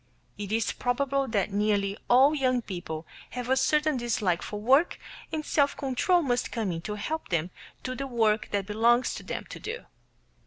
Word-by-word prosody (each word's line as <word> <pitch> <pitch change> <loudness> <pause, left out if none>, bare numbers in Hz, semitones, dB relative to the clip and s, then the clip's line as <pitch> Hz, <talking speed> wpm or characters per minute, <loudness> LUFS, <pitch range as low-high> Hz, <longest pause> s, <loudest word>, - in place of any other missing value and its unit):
It 205 -1 -6
is 225 0 +1
probable 275 +2 0
that 205 -3 0
nearly 200 -1 +1
all 265 +5 +6
young 255 -4 +1
people 170 -5 -6 0.3
have 250 0 -3
a - - +5
certain 300 +2 +2
dislike 215 -7 0
for 210 - -5
work, 270 +10 +3 0.3
and 310 -1 -3
self 285 -2 +2
control 295 +6 +2
must 245 -3 0
come 220 -6 -1
in 165 -1 -4
to 210 +4 -4
help 315 +10 -4
them 170 0 0 0.3
do 255 - -3
the 275 +2 -4
work 220 -4 +1
that 200 -2 -1
belongs 230 +4 +3
to - - -6
them - - -5
to - - -7
do. 450 +3 -6
240 Hz, 185 wpm, -28 LUFS, 205-275 Hz, 0.3 s, all